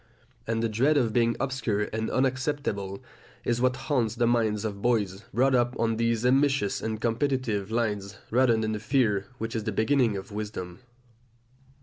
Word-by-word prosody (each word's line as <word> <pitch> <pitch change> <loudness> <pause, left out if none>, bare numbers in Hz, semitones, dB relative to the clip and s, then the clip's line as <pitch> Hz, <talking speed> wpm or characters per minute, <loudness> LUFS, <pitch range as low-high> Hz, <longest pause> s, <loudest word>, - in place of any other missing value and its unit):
And 115 0 0
the - - +2
dread 130 +8 +2
of 115 -5 +1
being 115 0 +2
obscure 130 -6 -1
and 110 0 -1
unacceptable 130 -7 -1 0.4
is 120 0 0
what 130 0 +3
haunts 130 -4 -1
the 120 - +2
minds 110 -3 +1
of 100 -2 -4
boys 105 -4 0
brought 130 +3 +3
up 120 0 +2
on 115 -1 +1
these 115 0 +1
ambitious 135 -5 +2
and 110 -1 -3
competitive 115 -4 0
lines, 105 -4 -2
rather 120 -1 +4
than 110 -1 -1
the 105 - -2
fear 105 -5 +1
which 115 +1 -4
is 110 -2 -2
the 110 - -1
beginning 110 0 +2
of 95 +2 -8
wisdom. 100 -4 -5
115 Hz, 165 wpm, -27 LUFS, 105-130 Hz, 0.4 s, rather